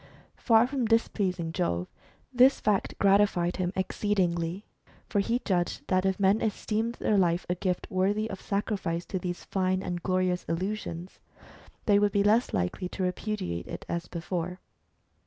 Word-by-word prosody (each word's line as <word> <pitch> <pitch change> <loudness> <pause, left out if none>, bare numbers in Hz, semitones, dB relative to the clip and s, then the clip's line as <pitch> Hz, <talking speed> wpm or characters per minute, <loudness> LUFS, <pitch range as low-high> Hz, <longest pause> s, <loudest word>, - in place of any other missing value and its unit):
Far 225 -1 +5
from 260 -1 -1
dis 225 +1 +3
pleasing 180 -5 -2
Jove, 90 - -1 0.5
this 255 +2 +6
fact 210 -2 0
gratified 195 -3 +3
him 180 -1 -1
exceedingly, 185 -2 -1 0.4
for 205 - 0
he 230 +4 +1
judged 175 -4 0
that 185 0 +2
if 190 0 0
men 200 +2 +3
esteemed 220 +1 -1
their 210 -2 +1
life 175 -1 +2
a 180 - +1
gift 180 0 -2
worthy 200 +4 +1
of 195 -3 -7
sacrifice 195 -4 -2
to 185 - -3
these 175 0 -4
fine 185 0 0
and 175 -1 -3
glorious 185 0 0
illusions, 180 0 -4 0.7
they 205 -2 +5
would 205 -1 +2
be 200 - +3
less 220 +4 +3
likely 90 - -2
to. 190 - -4
repudiate 180 - -3
it - - -7
as 170 0 -3
before. 180 +1 -4
190 Hz, 155 wpm, -28 LUFS, 175-210 Hz, 0.7 s, this